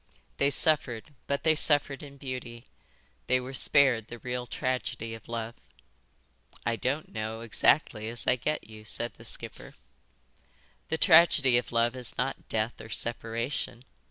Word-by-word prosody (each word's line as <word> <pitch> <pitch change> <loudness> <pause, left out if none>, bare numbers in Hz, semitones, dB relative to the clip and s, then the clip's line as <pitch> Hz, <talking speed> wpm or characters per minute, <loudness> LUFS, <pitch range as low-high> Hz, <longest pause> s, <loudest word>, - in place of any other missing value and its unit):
They 140 - +3
suffered, 145 -4 +2
but 140 +1 -1
they 160 - +5
suffered 145 -3 +3
in 140 -1 -11
beauty. 125 -3 -7 0.6
They 130 - +3
were 130 +1 -7
spared 130 -5 +4
the 120 - -8
real 125 +1 -4
tragedy 120 -3 -3
of 110 -1 -10
love." 115 0 -4 1.1
"I 115 - +1
don't 135 +6 -2
know 110 +1 -4
exactly 110 -1 +2
as 115 -1 -3
I 125 - +4
get 150 +3 -2
you," 110 -1 -12
said 120 +2 -4
the - - -14
skipper. - - -4 1.1
"The 160 - 0
tragedy 160 -7 +6
of 125 - -8
love 115 +1 +2
is 125 -2 -4
not 125 +3 -3
death 110 +2 -1
or 110 - -10
separation. 115 +2 -3
125 Hz, 150 wpm, -29 LUFS, 115-140 Hz, 1.1 s, tragedy